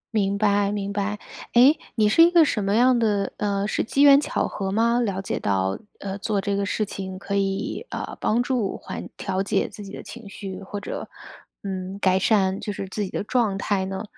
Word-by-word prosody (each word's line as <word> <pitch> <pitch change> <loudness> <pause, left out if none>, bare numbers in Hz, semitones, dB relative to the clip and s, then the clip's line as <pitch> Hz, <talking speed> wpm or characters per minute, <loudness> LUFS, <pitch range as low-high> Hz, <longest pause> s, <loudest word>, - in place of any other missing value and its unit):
明 200 -1 +1
白 205 -1 +2
明 200 -1 -3
白， 205 +1 -1 0.4
诶， 255 +6 +7 0.2
你 215 -2 +3
是 215 +10 +5
一 335 - +8
个 340 -2 +6
什 215 -7 -1
么 200 +1 +1
样 245 +1 +4
的 205 -3 0
呃， 200 -1 -1
是 - - 0
机 275 +5 +2
缘 280 0 +8
巧 - - -1
合 195 -1 -4
吗？ 235 +3 +2
了 200 -5 -1
解 195 - -3
到， 95 -1 0 0.2
呃， 195 0 -5
做 210 0 -1
这 200 0 -1
个 200 0 -1
事 215 - 0
情 190 -2 -6
可 200 +1 -6
以， 195 - -2
呃， - - -5
帮 235 +3 +2
助 245 -6 -1
缓 - - -7
调 190 0 -2
节 195 - 0
自 210 - -10
己 195 - -9
的 - - -8
情 230 -4 -10
绪， 195 -2 -7
或 200 +1 -6
者， 200 - -6 0.5
嗯， 190 -1 -4
改 190 -1 +3
善 195 -2 +2
就 210 - -4
是 195 -1 -5
自 210 - -4
己 190 - -4
的 - - -3
状 215 -3 +1
态 195 -1 0
呢？ 190 +1 -4
200 Hz, 235 characters per minute, -24 LUFS, 195-220 Hz, 0.5 s, 一